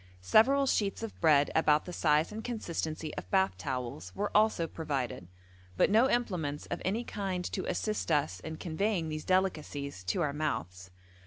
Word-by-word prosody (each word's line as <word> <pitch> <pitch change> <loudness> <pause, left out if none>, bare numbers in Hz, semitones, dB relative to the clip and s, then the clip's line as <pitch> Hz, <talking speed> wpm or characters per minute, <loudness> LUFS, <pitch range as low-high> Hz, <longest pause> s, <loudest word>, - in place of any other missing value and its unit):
Several 265 - +5
sheets 210 -4 0
of 225 - -7
bread 150 -4 +5
about 155 -2 +3
the 180 - -7
size 155 0 +2
and 220 +1 -6
consistency 165 -9 -4
of - - -6
bath 190 -1 +2
towels 125 - -4
were 205 +1 -3
also 210 -5 +4
provided, 140 - -3 0.5
but - - +4
no 230 +5 +5
implements 180 - -1
of - - -2
any 215 +6 0
kind 190 -5 -3
to 185 - -3
assist 215 +4 -2
us 150 +1 +1
in 160 0 -7
conveying 175 0 -1
these 155 0 -5
delicacies 150 - -1
to 95 - 0
our 145 -2 -1
mouths. 95 - -3
165 Hz, 165 wpm, -31 LUFS, 145-205 Hz, 0.5 s, Several